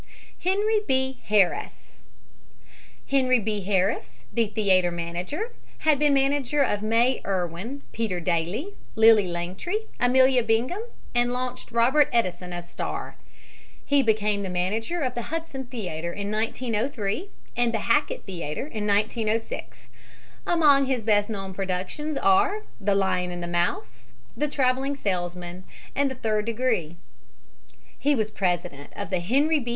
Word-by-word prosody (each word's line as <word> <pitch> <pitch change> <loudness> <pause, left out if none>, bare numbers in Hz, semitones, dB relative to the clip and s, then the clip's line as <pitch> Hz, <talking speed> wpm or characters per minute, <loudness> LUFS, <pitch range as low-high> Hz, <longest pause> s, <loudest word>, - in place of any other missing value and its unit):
HENRY 415 +4 +2
B. 265 0 +1
HARRIS 200 -4 +1 1.1
Henry 255 -2 +3
B. 210 -1 -2
Harris, 195 +1 0
the 230 -2 +2
theater 195 -4 +3
manager, 175 - -4 0.3
had 305 -3 +4
been 295 -1 +4
manager 280 +1 +2
of 205 -6 0
May 230 +4 +2
Irwin, 190 +8 -3
Peter 215 -6 -2
Dailey, 175 - -1 0.2
Lily 220 -3 +6
Langtry, 185 - -3
Amelia 260 +1 +5
Bingham, 230 - 0 0.3
and 240 0 +2
launched 250 -1 -4
Robert 255 +5 +4
Edeson 180 -6 0
as 175 0 -6
star. - - -5 0.7
He 285 -1 +4
became 210 -3 +1
the 195 - -3
manager 215 - -1
of 255 -3 0
the 240 - -3
Hudson 320 -5 -4
Theater 175 -9 -4
in 200 +2 -4
1903 225 - -1 0.3
and 240 -1 +2
the 225 -2 -1
Hackett 290 +6 +1
Theater 170 - -4
in 215 -7 -4
1906. 215 +2 -1 0.6
Among 290 -5 +5
his 255 -4 0
best 205 -1 +3
known 195 -3 -4
productions 195 +11 -3
are 395 +2 +3 0.2
"The 200 0 +1
Lion 185 -2 +1
and 175 -1 -5
the - - -3
Mouse," 125 -9 -2 0.2
"The 300 - 0
Traveling 270 0 +1
Salesman" 180 -5 -3 0.3
and 280 0 +2
"The 265 - -5
Third 215 -3 0
Degree." 225 -9 0 1.0
He 290 0 +3
was 215 -3 -1
president 175 -7 -2
of 200 -1 -5
the 185 - +1
Henry 280 - +2
B. 240 -3 -5
225 Hz, 135 wpm, -25 LUFS, 185-265 Hz, 1.1 s, Lily